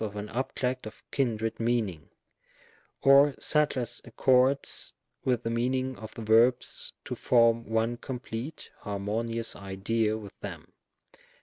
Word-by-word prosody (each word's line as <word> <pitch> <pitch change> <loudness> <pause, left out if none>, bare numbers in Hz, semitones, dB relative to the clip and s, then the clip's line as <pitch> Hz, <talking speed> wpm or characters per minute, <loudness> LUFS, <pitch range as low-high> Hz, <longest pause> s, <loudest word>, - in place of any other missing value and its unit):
of 105 -1 -4
an 105 0 -5
object 130 -1 -2
of 110 - -12
kindred 115 -5 -1
meaning 110 -10 -1 0.5
— - - -31
or 140 0 +7
such 150 -2 +2
as 120 -3 -3
accords 130 +3 +2 0.3
with 125 -2 +1
the - - -1
meaning 130 +2 0
of 110 -2 -9
the 115 - -6
verbs 115 +3 +3
to - - -4
form 115 -2 +3
one 115 +1 +1
complete 125 +3 -6
harmonious 110 +3 -2
idea 105 +3 -1
with 105 -3 -10
them. - - -8
115 Hz, 130 wpm, -29 LUFS, 110-130 Hz, 0.5 s, or